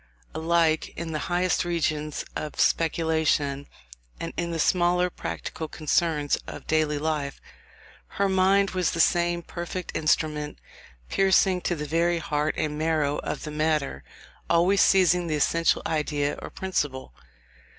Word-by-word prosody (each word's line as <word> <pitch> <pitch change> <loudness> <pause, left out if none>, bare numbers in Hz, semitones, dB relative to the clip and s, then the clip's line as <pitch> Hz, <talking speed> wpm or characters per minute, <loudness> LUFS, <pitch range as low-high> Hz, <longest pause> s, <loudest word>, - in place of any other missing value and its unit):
Alike 160 -1 +1
in 170 -1 -4
the 155 - -2
highest 180 +1 +1
regions 155 -3 -2
of 150 - -5
speculation 160 -4 +1 0.5
and - - -5
in 170 0 -2
the 165 - -3
smaller 180 +2 +2
practical 160 - -5
concerns 155 -1 0
of - - -8
daily 155 -1 +1
life, 150 -2 -2 0.8
her 200 - +3
mind 195 +1 +3
was 185 -2 0
the 165 - -3
same 175 +1 +2
perfect 175 +2 -6
instrument, 150 -1 0 0.5
piercing 190 - +3
to 175 - -1
the 150 -1 -4
very 170 +3 +1
heart 150 -1 -1
and 150 -1 -2
marrow 155 -2 +1
of - - -4
the 150 - -5
matter; 150 - -1 0.5
always 180 +4 +4
seizing 180 -2 +4
the 155 - 0
essential 165 +3 +2
idea 150 -2 0
or - - -7
principle. 145 - -3
160 Hz, 135 wpm, -26 LUFS, 150-175 Hz, 0.8 s, always